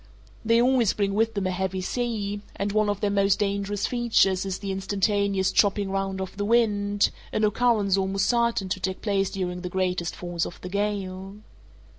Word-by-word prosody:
They 230 Hz, +1 st, +3 dB
always 245 Hz, -3 st, +3 dB
bring 200 Hz, -1 st, 0 dB
with 225 Hz, +2 st, +1 dB
them 200 Hz, -2 st, -1 dB
a 185 Hz, -, 0 dB
heavy 190 Hz, 0 st, -2 dB
sea, 205 Hz, -2 st, -2 dB
and 200 Hz, +1 st, -2 dB
one 215 Hz, 0 st, +2 dB
of 205 Hz, -1 st, -2 dB
their 205 Hz, -, +1 dB
most 200 Hz, -1 st, +3 dB
dangerous 200 Hz, 0 st, -1 dB
features 220 Hz, -6 st, +2 dB
is 190 Hz, -1 st, -2 dB
the 200 Hz, -1 st, -5 dB
instantaneous 195 Hz, 0 st, 0 dB
chopping 200 Hz, -1 st, +2 dB
round 195 Hz, 0 st, -2 dB
of 190 Hz, 0 st, -6 dB
the 205 Hz, -, -1 dB
wind, 205 Hz, -2 st, +2 dB, 0.2 s
an 215 Hz, -, -1 dB
occurrence 210 Hz, -3 st, +2 dB
almost 195 Hz, 0 st, 0 dB
certain 235 Hz, -5 st, +1 dB
to 185 Hz, -, -2 dB
take 190 Hz, 0 st, -3 dB
place 195 Hz, -2 st, +1 dB
during 180 Hz, -2 st, -4 dB
the 180 Hz, -, -4 dB
greatest 180 Hz, -2 st, -1 dB
force 175 Hz, -1 st, -3 dB
of -, -, -11 dB
the 180 Hz, -, -6 dB
gale. 195 Hz, -1 st, -3 dB
200 Hz, 185 wpm, -25 LUFS, 190-210 Hz, 0.2 s, They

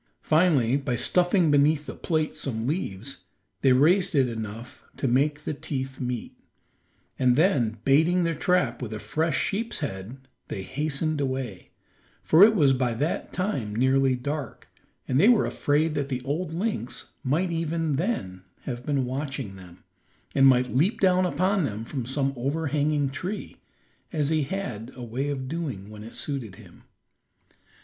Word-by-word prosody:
Finally 155 Hz, -7 st, +3 dB
by 130 Hz, -3 st, -2 dB
stuffing 175 Hz, -, +3 dB
beneath 145 Hz, +1 st, +3 dB
the -, -, -6 dB
plate 155 Hz, -3 st, -1 dB
some 120 Hz, -7 st, -3 dB
leaves, 140 Hz, -, -4 dB, 0.4 s
they 135 Hz, -, +5 dB
raised 160 Hz, +8 st, +4 dB
it 135 Hz, -3 st, +4 dB
enough 115 Hz, +1 st, -7 dB, 0.2 s
to 135 Hz, -, -1 dB
make 145 Hz, +4 st, +1 dB
the -, -, -2 dB
teeth 135 Hz, -2 st, -5 dB
meet, 125 Hz, -2 st, -4 dB, 0.8 s
and 125 Hz, -1 st, +4 dB
then 130 Hz, -, +2 dB
baiting 160 Hz, +6 st, +4 dB
their 165 Hz, 0 st, +1 dB
trap 180 Hz, -1 st, +1 dB
with 115 Hz, -3 st, -4 dB
a 110 Hz, -, -5 dB
fresh 155 Hz, +4 st, 0 dB
sheep's 225 Hz, +4 st, -1 dB
head, 130 Hz, +1 st, -6 dB, 0.2 s
they 95 Hz, -, -5 dB
hastened 150 Hz, -, -1 dB
away, 130 Hz, -8 st, -3 dB, 0.5 s
for 160 Hz, +5 st, +6 dB
it 220 Hz, +1 st, +7 dB
was 145 Hz, -8 st, +5 dB
by 125 Hz, -3 st, 0 dB
that 150 Hz, +8 st, -2 dB
time 155 Hz, -, -2 dB
nearly 130 Hz, +2 st, +3 dB
dark, 145 Hz, +3 st, -5 dB, 0.4 s
and 130 Hz, -, +2 dB
they 205 Hz, +8 st, +6 dB
were 240 Hz, -3 st, +5 dB
afraid 150 Hz, +2 st, +1 dB
that 145 Hz, -2 st, -2 dB
the 125 Hz, -2 st, -3 dB
old 155 Hz, +5 st, -2 dB
lynx 165 Hz, -, -3 dB
might 160 Hz, +7 st, +1 dB
even 165 Hz, -2 st, -1 dB
then 105 Hz, -, -2 dB, 0.2 s
have 120 Hz, -2 st, -5 dB
been 140 Hz, -2 st, 0 dB
watching 135 Hz, -5 st, -4 dB
them, 90 Hz, -2 st, -14 dB, 0.5 s
and 135 Hz, -1 st, +6 dB
might 125 Hz, -1 st, +3 dB
leap 185 Hz, -, +2 dB
down 185 Hz, -1 st, +4 dB
upon 185 Hz, +2 st, +1 dB
them 110 Hz, -4 st, -3 dB
from 125 Hz, -2 st, -4 dB
some 135 Hz, +1 st, 0 dB
overhanging 145 Hz, +2 st, 0 dB
tree, 190 Hz, +8 st, -5 dB, 0.6 s
as 150 Hz, -4 st, 0 dB
he 160 Hz, -1 st, +2 dB
had 125 Hz, -, -5 dB
a 125 Hz, -, -8 dB
way 125 Hz, +5 st, -3 dB
of 130 Hz, -2 st, -3 dB
doing 130 Hz, -, -4 dB
when 105 Hz, 0 st, -9 dB
it 115 Hz, -, -10 dB
suited 130 Hz, -10 st, -4 dB
him. -, -, -16 dB
140 Hz, 160 wpm, -26 LUFS, 125-160 Hz, 0.8 s, it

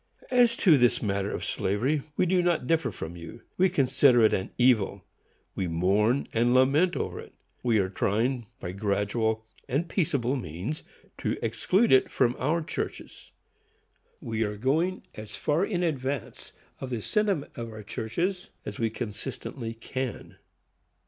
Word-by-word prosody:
As 245 Hz, -2 st, +4 dB
to 160 Hz, -8 st, +5 dB
this 120 Hz, -1 st, +3 dB
matter 100 Hz, -1 st, 0 dB
of -, -, -4 dB
slavery, 125 Hz, +10 st, 0 dB, 0.2 s
we -, -, +3 dB
do 180 Hz, +1 st, +3 dB
not 175 Hz, -6 st, +1 dB
differ 160 Hz, -3 st, +1 dB
from 85 Hz, -3 st, -7 dB
you. 85 Hz, +7 st, -10 dB, 0.2 s
We 190 Hz, +1 st, +5 dB
consider 130 Hz, -4 st, +4 dB
it 110 Hz, -, +5 dB
an 95 Hz, -, -1 dB
evil. 110 Hz, -6 st, +3 dB, 0.5 s
We 95 Hz, -, -2 dB
mourn 100 Hz, +10 st, +2 dB
and 120 Hz, +2 st, +3 dB
lament 145 Hz, +8 st, +4 dB
over -, -, -3 dB
it. -, -, -12 dB, 0.3 s
We 115 Hz, -3 st, +2 dB
are 95 Hz, -2 st, +2 dB
trying, 115 Hz, +5 st, 0 dB
by 90 Hz, -, -5 dB
gradual 105 Hz, +3 st, -1 dB, 0.2 s
and 145 Hz, +7 st, 0 dB
peaceable 145 Hz, -, 0 dB
means, 115 Hz, -, -4 dB, 0.4 s
to -, -, -1 dB
exclude 210 Hz, +5 st, +2 dB
it 130 Hz, -, +5 dB
from 120 Hz, 0 st, +2 dB
our 160 Hz, +5 st, +1 dB
churches. -, -, -6 dB, 0.9 s
We 115 Hz, -1 st, -3 dB
are 105 Hz, -1 st, -1 dB
going 160 Hz, -, 0 dB
as 110 Hz, -1 st, -9 dB
far 155 Hz, +4 st, +1 dB
in 180 Hz, -3 st, -1 dB
advance 140 Hz, -5 st, -3 dB, 0.3 s
of 130 Hz, -, -5 dB
the 120 Hz, -4 st, -3 dB
sentiment 200 Hz, -8 st, 0 dB
of 115 Hz, -1 st, -5 dB
our 110 Hz, -1 st, -9 dB
churches 170 Hz, -, -3 dB, 0.2 s
as 100 Hz, -, -6 dB
we 115 Hz, -1 st, +1 dB
consistently 115 Hz, +2 st, -5 dB
can. 130 Hz, +2 st, -5 dB
125 Hz, 155 wpm, -27 LUFS, 110-155 Hz, 0.9 s, to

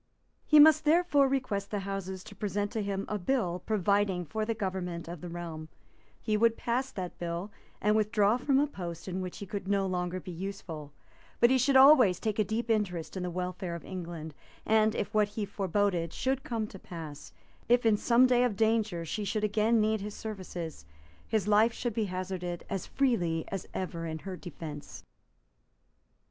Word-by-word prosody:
He 305 Hz, -, +7 dB
must 310 Hz, +1 st, +8 dB
therefore 310 Hz, -3 st, +4 dB
request 245 Hz, -7 st, -1 dB
the 205 Hz, -2 st, -2 dB
Houses 190 Hz, -1 st, -5 dB
to -, -, -11 dB
present 205 Hz, 0 st, -2 dB
to 225 Hz, -, -2 dB
him 200 Hz, -1 st, -2 dB
a 210 Hz, -, -2 dB
bill 180 Hz, -5 st, 0 dB
providing 200 Hz, -3 st, +1 dB
for 215 Hz, +6 st, -2 dB
the 230 Hz, 0 st, -1 dB
government 185 Hz, -4 st, -3 dB
of 170 Hz, -2 st, -7 dB
the 175 Hz, -, -6 dB
realm; 165 Hz, -2 st, -6 dB, 0.5 s
he 215 Hz, -, 0 dB
would 230 Hz, +1 st, +3 dB
pass 250 Hz, +3 st, -1 dB
that 180 Hz, -2 st, -6 dB
bill, 175 Hz, +4 st, -4 dB, 0.3 s
and 210 Hz, +1 st, +2 dB
withdraw 215 Hz, 0 st, +3 dB
from 265 Hz, +1 st, +2 dB
a 285 Hz, -, +4 dB
post 175 Hz, -, -7 dB
in 185 Hz, 0 st, -3 dB
which 180 Hz, -1 st, -5 dB
he 200 Hz, -, -6 dB
could 200 Hz, 0 st, -5 dB
no 200 Hz, -1 st, +2 dB
longer 180 Hz, -1 st, -2 dB
be 180 Hz, -, -8 dB
useful, 170 Hz, -5 st, -6 dB, 0.5 s
but 240 Hz, +1 st, +6 dB
he 260 Hz, -, +4 dB
should 270 Hz, +2 st, +3 dB
always 265 Hz, -8 st, +7 dB
take 215 Hz, -1 st, -2 dB
a -, -, +5 dB
deep 220 Hz, +3 st, -2 dB
interest 200 Hz, -8 st, -1 dB
in 185 Hz, -, -3 dB
the 180 Hz, -, -2 dB
welfare 180 Hz, 0 st, -4 dB
of 170 Hz, -, -9 dB
England; 170 Hz, -4 st, -6 dB, 0.3 s
and, 220 Hz, 0 st, +3 dB
if 205 Hz, +2 st, -3 dB
what 210 Hz, -1 st, +4 dB
he 210 Hz, 0 st, -4 dB
foreboded 195 Hz, -3 st, 0 dB
should 265 Hz, +1 st, -1 dB
come 230 Hz, -7 st, -2 dB
to 195 Hz, -2 st, -10 dB
pass, 160 Hz, -5 st, -9 dB, 0.4 s
if 245 Hz, 0 st, +4 dB
in 220 Hz, -2 st, +5 dB
some 235 Hz, +4 st, +4 dB
day 250 Hz, -1 st, +4 dB
of 245 Hz, -5 st, +1 dB
danger 220 Hz, -5 st, +1 dB
she 210 Hz, +6 st, -3 dB
should 210 Hz, +2 st, -1 dB
again 215 Hz, +2 st, +3 dB
need 215 Hz, 0 st, +1 dB
his 205 Hz, +1 st, -6 dB
services, 180 Hz, -, -6 dB, 0.4 s
his 215 Hz, -3 st, 0 dB
life 215 Hz, +2 st, +4 dB
should 240 Hz, -1 st, -3 dB
be 220 Hz, 0 st, 0 dB
hazarded 185 Hz, -2 st, -4 dB
as 195 Hz, -3 st, -3 dB
freely 175 Hz, -, +1 dB
as 195 Hz, -2 st, -5 dB
ever 170 Hz, -3 st, -3 dB
in 160 Hz, 0 st, -4 dB
her 185 Hz, +4 st, -6 dB
defence. 160 Hz, -5 st, -8 dB
200 Hz, 190 wpm, -30 LUFS, 180-220 Hz, 0.5 s, must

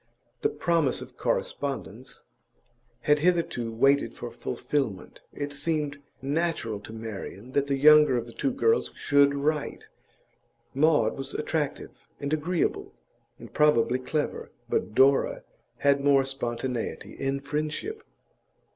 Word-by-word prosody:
The 430 Hz, -, +2 dB
promise 170 Hz, -, +1 dB
of -, -, -15 dB
correspondence 130 Hz, -3 st, -3 dB, 0.8 s
had 150 Hz, 0 st, +3 dB
hitherto 165 Hz, -9 st, +1 dB
waited 135 Hz, +5 st, +2 dB
for -, -, -7 dB
fulfilment. 130 Hz, -10 st, -3 dB
It 145 Hz, 0 st, -5 dB
seemed 145 Hz, -1 st, -1 dB, 0.2 s
natural 140 Hz, -7 st, -1 dB
to 105 Hz, -, -11 dB
Marian 110 Hz, +1 st, -7 dB
that 140 Hz, +1 st, +1 dB
the 140 Hz, -1 st, 0 dB
younger 150 Hz, -2 st, +7 dB
of 120 Hz, -, -2 dB
the 120 Hz, -, -12 dB
two 275 Hz, -, 0 dB
girls 450 Hz, -, +2 dB
should 140 Hz, 0 st, +3 dB
write; 150 Hz, +1 st, -2 dB, 0.8 s
Maud 145 Hz, -5 st, +3 dB
was 135 Hz, 0 st, -6 dB
attractive 150 Hz, -1 st, -2 dB, 0.3 s
and 140 Hz, +1 st, -2 dB
agreeable, 160 Hz, +3 st, -1 dB, 0.4 s
and -, -, -12 dB
probably 130 Hz, -4 st, +3 dB
clever, 150 Hz, +3 st, -3 dB, 0.2 s
but 110 Hz, -, -1 dB
Dora 135 Hz, +1 st, +4 dB, 0.3 s
had 140 Hz, 0 st, +2 dB
more 140 Hz, -1 st, +4 dB
spontaneity 125 Hz, -2 st, -4 dB
in 135 Hz, 0 st, -2 dB
friendship. 155 Hz, -, -3 dB
140 Hz, 120 wpm, -27 LUFS, 130-150 Hz, 0.8 s, younger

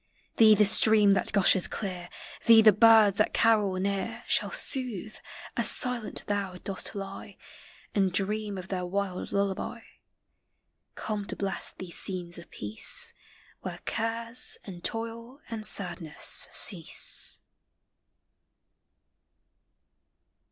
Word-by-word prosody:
Thee 215 Hz, -2 st, +6 dB
the 210 Hz, +1 st, +3 dB
stream 210 Hz, 0 st, +5 dB
that 195 Hz, -, 0 dB
gushes 195 Hz, -2 st, +4 dB
clear, 180 Hz, -4 st, -6 dB, 0.4 s
Thee 225 Hz, -1 st, +7 dB
the 215 Hz, -, +8 dB
birds 215 Hz, -1 st, +5 dB
that -, -, 0 dB
carol 215 Hz, -4 st, +3 dB
near 200 Hz, +5 st, -3 dB
Shall -, -, +1 dB
soothe, 230 Hz, -, -2 dB, 0.4 s
as -, -, +3 dB
silent 250 Hz, -3 st, -2 dB
thou 200 Hz, -3 st, -3 dB
dost 195 Hz, +1 st, -4 dB
lie 195 Hz, -1 st, -9 dB, 0.6 s
And 195 Hz, -2 st, +1 dB
dream 205 Hz, +2 st, -2 dB
of 185 Hz, 0 st, -9 dB
their 185 Hz, -2 st, -3 dB
wild 185 Hz, 0 st, -4 dB
lullaby; 200 Hz, -1 st, -3 dB, 1.1 s
Come 210 Hz, -2 st, -5 dB
to -, -, -6 dB
bless 195 Hz, -1 st, -2 dB
these 180 Hz, -2 st, -3 dB
scenes 175 Hz, -3 st, -2 dB
of 170 Hz, -, -15 dB
peace, 105 Hz, +1 st, -1 dB, 0.5 s
Where -, -, -7 dB
cares 230 Hz, +2 st, -1 dB
and 180 Hz, -4 st, -11 dB
toil 230 Hz, +3 st, -6 dB
and 220 Hz, -1 st, -3 dB
sadness 175 Hz, -5 st, +2 dB
cease. -, -, +3 dB
200 Hz, 115 wpm, -27 LUFS, 190-225 Hz, 1.1 s, the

